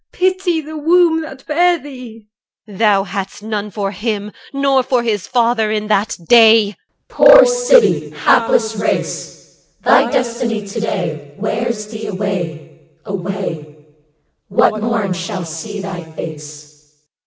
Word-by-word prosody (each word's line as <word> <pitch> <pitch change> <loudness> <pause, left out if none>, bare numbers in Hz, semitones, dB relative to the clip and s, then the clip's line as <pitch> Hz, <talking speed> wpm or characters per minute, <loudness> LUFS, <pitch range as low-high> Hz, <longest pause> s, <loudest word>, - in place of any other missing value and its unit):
Pity 370 -2 0
the 310 +1 -8
womb 330 +1 +3
that 270 -4 -10
bare 345 +4 +2
thee. 250 -7 -11 0.4
EL. 205 - -12
Thou 205 -3 +3
hadst 195 +1 -6
none 210 -1 -4
For 200 -1 -3
him, 210 0 -4 0.2
nor 275 -1 +2
for 250 -1 0
his 210 -5 -2
father, 235 -3 +1
in 215 0 -2
that 210 0 0
day. 225 -2 +7
HALF 205 - -8
CH. - - -48
Poor - - +7
city! - - +3
hapless 225 -2 +2
race! - - -4 0.2
1 - - +4
Thy - - -5
destiny 235 -3 -1
to 200 +3 -6
day 160 -9 -4
Wears 215 +1 -2
thee 220 -1 -6
away, 185 -6 -5 0.2
away. 185 -6 -5 0.7
What 215 +2 +2
morn 220 -4 -1
shall 180 0 -5
see 165 +6 -7
thy 190 -3 -6
face? 150 -2 -11
215 Hz, 140 wpm, -17 LUFS, 195-250 Hz, 0.7 s, day